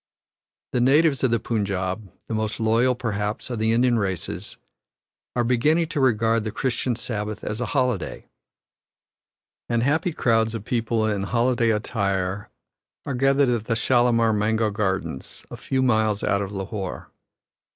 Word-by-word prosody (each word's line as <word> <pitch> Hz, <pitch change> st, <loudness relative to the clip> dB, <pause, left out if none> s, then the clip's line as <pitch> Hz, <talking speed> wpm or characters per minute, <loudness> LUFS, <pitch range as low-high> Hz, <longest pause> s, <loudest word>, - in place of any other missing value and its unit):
The 125 Hz, -, +1 dB
natives 140 Hz, +2 st, +4 dB
of 130 Hz, -, +4 dB
the 115 Hz, 0 st, +2 dB
Punjab, 100 Hz, -3 st, -2 dB, 0.2 s
the -, -, -4 dB
most 110 Hz, +1 st, -2 dB
loyal, 115 Hz, +3 st, +3 dB
perhaps, 105 Hz, -1 st, -3 dB
of 120 Hz, -, -3 dB
the 110 Hz, +1 st, +2 dB
Indian 120 Hz, 0 st, +3 dB
races, 95 Hz, -1 st, -4 dB, 0.8 s
are 120 Hz, -, +2 dB
beginning 150 Hz, +8 st, +2 dB
to 150 Hz, -, -2 dB
regard 115 Hz, -3 st, +2 dB
the 110 Hz, -, -3 dB
Christian 120 Hz, +1 st, -1 dB
Sabbath 110 Hz, -4 st, -4 dB
as 105 Hz, +3 st, -3 dB
a 120 Hz, -, -1 dB
holiday, 125 Hz, -, -1 dB, 1.4 s
and 120 Hz, -1 st, +1 dB
happy 160 Hz, +6 st, +1 dB
crowds 115 Hz, -6 st, +1 dB
of 110 Hz, -2 st, -6 dB
people 115 Hz, -2 st, 0 dB
in 105 Hz, -2 st, 0 dB
holiday 120 Hz, +3 st, +1 dB
attire 100 Hz, -3 st, -1 dB, 0.6 s
are 140 Hz, -, -3 dB
gathered 135 Hz, +1 st, +3 dB
at 115 Hz, -3 st, 0 dB
the 115 Hz, -, 0 dB
Shalamar 115 Hz, -1 st, +3 dB
Mango 110 Hz, +1 st, +1 dB
Gardens, 95 Hz, -9 st, -3 dB
a -, -, -5 dB
few 130 Hz, -1 st, -1 dB
miles 110 Hz, -4 st, +2 dB
out 100 Hz, 0 st, +1 dB
of 100 Hz, -1 st, -4 dB
Lahore. 95 Hz, -1 st, -5 dB
115 Hz, 150 wpm, -24 LUFS, 105-125 Hz, 1.4 s, natives